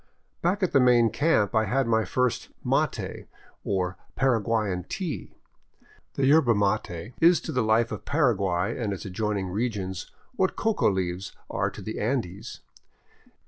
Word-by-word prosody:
Back 190 +4 +1
at 185 - +1
the 140 - +5
main 120 -3 +5
camp 140 -10 +2
I 110 0 +3
had 130 +6 +1
my 110 -1 +2
first 125 +4 0 0.2
mate, - - -1 0.4
or 95 -2 -1
" - - -35
Paraguayan 110 -7 +1
tea." 175 -7 -5 0.8
The 135 - +1
yerba 140 -4 +5
mate 100 0 -1
is 170 +1 +6
to - - -5
the 130 -4 +1
life 110 +1 +2
of 105 -1 -5
Paraguay 105 - +1
and 105 -3 -1
its 95 - -7
adjoining 100 0 -2
regions 95 -3 -3 0.3
what 190 -4 +1
coca 220 -1 +1
leaves 95 -1 -2 0.2
are - - 0
to - - -10
the - - -5
Andes. 105 -5 -3
110 Hz, 150 wpm, -26 LUFS, 95-135 Hz, 0.8 s, is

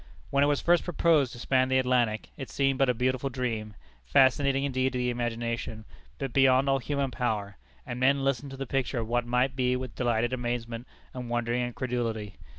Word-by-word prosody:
When 140 0 +3
it - - +4
was 145 -1 +1
first 175 0 +3
proposed 160 -6 +2
to - - -9
span 130 +1 +2
the 130 - +3
Atlantic, 125 -4 +1
it 135 - -7
seemed 135 -1 0
but 135 -1 +4
a - - +4
beautiful 130 +2 0
dream, 115 -5 -3 0.3
fascinating 135 - +3
indeed 130 -1 0
to - - -1
the 125 0 0
imagination, 115 -2 -3 0.3
but 135 -3 -4
beyond 135 0 +4
all 135 0 +3
human 140 +1 -2
power; 105 -5 -2 0.3
and 120 - -5
men 135 +2 +3
listened 135 0 0
to 135 - -8
the 135 - -4
picture 135 0 -1
of 115 -2 -2
what 120 +1 0
might 125 +2 +1
be 125 -1 +1
with 125 -2 -5
delighted 120 0 0
amazement 120 -1 -3 0.3
and 125 -2 -6
wondering 120 +1 0
incredulity. 120 -4 -3
125 Hz, 195 wpm, -28 LUFS, 120-135 Hz, 0.3 s, it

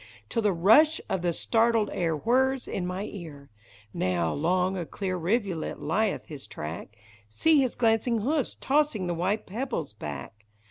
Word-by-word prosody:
Till 230 - 0
the 210 -2 +3
rush 225 - +5
of 190 - -1
the 175 -1 +1
startled 225 +4 +2
air 165 -3 0
whirs 260 - +1
in 180 -2 -3
my 185 +2 -3
ear! 155 - -9 0.4
Now 85 -3 0
'long 180 +5 +1
a 180 - -2
clear 185 +3 -4
rivulet 185 -1 -1
lieth 215 -1 0
his 145 -5 -8
track, 80 +8 -7 0.2
— 110 - -27
See 305 - +3
his 255 -3 -1
glancing 225 0 +2
hoofs 285 +4 0
tossing 275 -9 +1
tlie 175 - -1
white 190 +6 -1
pebbles 215 - -4
back 100 +4 -8
190 Hz, 165 wpm, -27 LUFS, 160-230 Hz, 0.4 s, rush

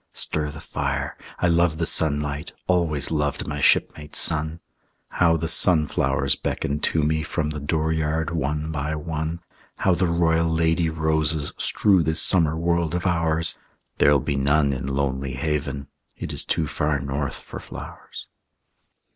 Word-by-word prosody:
Stir 75 -1 0
the 75 0 -9
fire.... 70 -2 -3 0.2
I 90 - +1
love 85 -1 +2
the 85 - -1
sunlight, 75 -2 0
Always 85 -6 +2
loved 75 -2 -1
my 75 -1 -4
shipmate 75 +2 +2
sun. 80 +1 +2 0.5
How 85 -2 +2
the 80 - -3
sunflowers 75 -5 +3
beckon 70 +1 -3
to 80 0 0
me 80 +1 +1
From 75 -1 -2
the 75 - -5
dooryard 80 +1 -1
one 75 0 -2
by 75 0 -3
one! 80 +1 -4 0.3
How 95 - +1
the 90 +1 +1
royal 85 -1 +1
lady 80 +1 +1
roses 80 -1 0
Strew 95 -4 +3
this 80 0 +2
summer 80 -4 +3
world 85 0 0
of 90 - -3
ours! 80 -2 +1 0.4
There'll 70 0 +5
be 70 - -2
none 70 +1 +2
in 65 0 -5
Lonely 70 -1 -2
Haven; 70 0 -3 0.3
It - - -6
is - - 0
too 80 - 0
far 75 0 -1
north 70 0 -3
for - - -9
flowers. - - -10
80 Hz, 150 wpm, -23 LUFS, 75-80 Hz, 0.5 s, There'll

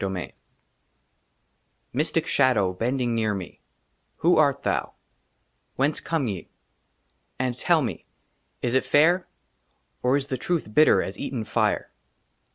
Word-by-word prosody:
^* 95 -1 -2
VII 90 -3 -5 1.6
MYSTIC 155 +4 0
SHADOW, 115 -9 +2
BENDING 120 +4 -1
NEAR 110 -2 0
ME, 95 -2 -8 0.5
WHO - - +3
ART - - +3
THOU? - - -1 0.8
WHENCE 140 +4 0
COME 160 -6 -1
YE? 95 -4 -5 0.9
AND 125 -1 -1
TELL 160 +4 +2
ME 110 -9 -5 0.6
IS 120 - 0
IT 130 - +3
FAIR 170 +5 +3 0.7
OR 125 +3 +3
IS 140 - -2
THE 130 -3 -4
TRUTH 160 -9 -2
BITTER 155 +5 +5
AS - - -6
EATEN 130 -5 -3
FIRE? - - 0
130 Hz, 130 wpm, -25 LUFS, 110-145 Hz, 1.6 s, BITTER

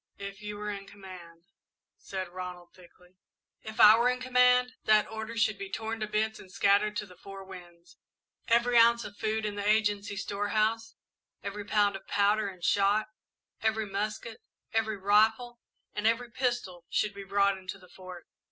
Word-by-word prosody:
"If 200 0 -8
you 210 0 -6
were 210 0 -4
in 200 -1 -7
command 185 -4 -12 0.3
" - - -62
said 190 -1 -3
Ronald, 180 -1 -8
thickly. 180 0 -19 0.5
"If 220 0 -9
I 215 +2 +9
were 245 +1 +4
in 250 0 -1
command, 250 0 +3
that 215 -1 +4
order 220 +1 -6
should 215 -3 +1
be 195 -1 -6
torn 225 +2 -4
to 215 - -2
bits 220 +1 -1
and 185 - -14
scattered 200 +2 +2
to 210 - -3
the 180 -2 -16
four 195 0 -10
winds. 175 -2 -14 0.5
Every 235 +1 +4
ounce 235 0 +5
of 205 - -9
food 220 0 -1
in 210 - -2
the 205 0 -4
Agency 205 -1 +1
storehouse, 215 +3 -1 0.5
every 200 +1 -5
pound 205 -1 +2
of 195 - -10
powder 205 +1 +2
and 185 -3 -10
shot, 205 +3 +2 0.5
every 220 0 0
musket, 210 +3 -4 0.3
every 220 -1 0
rifle, 220 +5 +2 0.3
and 210 +1 0
every 235 +1 0
pistol, 240 -9 -2
should 210 -1 0
be 200 0 -8
brought 200 0 +1
into 185 0 -7
the 180 -2 -18
Fort. 185 -2 -10
210 Hz, 175 wpm, -29 LUFS, 195-220 Hz, 0.5 s, I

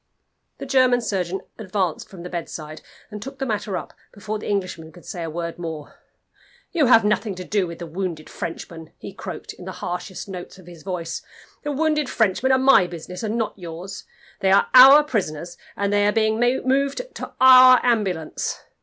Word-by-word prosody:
The - - -7
German 255 -2 +3
surgeon 190 -4 -2 0.2
advanced 190 -4 -2
from 180 -3 -11
the 180 - -7
bedside, 155 -3 -6 0.3
and 210 -1 -7
took 270 +4 -8
the 270 - -3
matter 210 -4 -2
up - - -8 0.2
before 215 +1 -5
the - - -6
Englishman 185 -5 -3
could 175 - -16
say 175 - -6
a 165 - -4
word 170 +1 -5
more. 160 -3 -6 0.8
"You 310 -6 +2
have 225 -3 +6
nothing 210 -1 0
to 185 - -7
do 200 -1 0
with 170 0 -8
the 170 - -7
wounded 165 -2 -5
Frenchmen," 165 -1 -7
he - - -9
croaked, - - -8
in - - -12
the - - -6
harshest 180 +2 -6
notes 185 -1 -8
of 185 - -15
his 170 -2 -13
voice. 175 -3 -4 0.4
"The 295 - -3
wounded 300 -1 0
Frenchmen 220 +4 +1
are 260 - +5
my 260 -8 +5
business, 175 +1 -8
and 220 0 -2
not 225 -2 -1
yours. 175 +1 -8 0.3
They 190 - +2
are 195 - +4
our 270 +4 +10
prisoners, 175 - -3 0.2
and 200 0 0
they 205 0 +3
are - - +3
being 220 0 +1
moved 265 - +1
to - - -8
our 255 -1 +9
ambulance. 195 -10 -1
195 Hz, 190 wpm, -22 LUFS, 175-245 Hz, 0.8 s, our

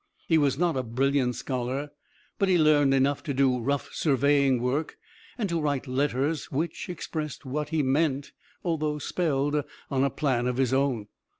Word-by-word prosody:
He 165 -2 +4
was 140 -3 +2
not 170 -1 +1
a 130 - +1
brilliant 130 +1 +1
scholar, 130 +3 -3 0.5
but 195 - +2
he 180 - +5
learned 150 -3 +4
enough 135 +1 +2
to 140 -4 -4
do 130 -2 +3
rough 140 +4 -2
surveying 140 -2 +3
work, 130 +6 -1 0.4
and 220 -5 -1
to 170 -1 0
write 145 -3 -1
letters 140 +3 -1
which 160 +6 -3
expressed 155 -4 -5
what 150 +3 -3
he 160 -2 +1
meant 140 +1 +1 0.3
although 155 -3 -1
spelled 145 -1 0 0.3
on 135 -1 +2
a 140 - +3
plan 130 -4 0
of 125 0 -1
his 130 -2 +1
own. 130 -5 +1
140 Hz, 170 wpm, -27 LUFS, 130-150 Hz, 0.5 s, he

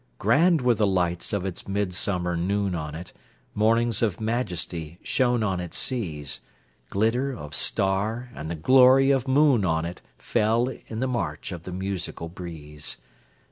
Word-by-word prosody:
Grand 155 - +4
were 125 -1 +4
the 105 -2 +2
lights 90 -2 0
of 100 -2 -1
its 95 -3 -5
midsummer 90 -2 -1
noon 100 +3 0
on 75 -3 -4
it—Mornings 110 +6 -1
of 105 -5 0
majesty 90 -8 -3
shone 120 -3 +2
on 95 -4 0
its 90 -1 -4
seas:Glitter 105 - -2
of 75 - -8
star 105 - 0
and 75 +1 -6
the 85 - -2
glory 130 - +6
of 135 -1 +1
moon 135 -4 +4
on 80 -3 +1
itFell, 115 +7 -1
in 110 +1 -5
the 130 - +1
march 100 -13 -3
of 85 -2 -7
the 90 - -6
musical 95 -3 -4
breeze. 80 -4 -8
100 Hz, 140 wpm, -25 LUFS, 85-120 Hz, -, glory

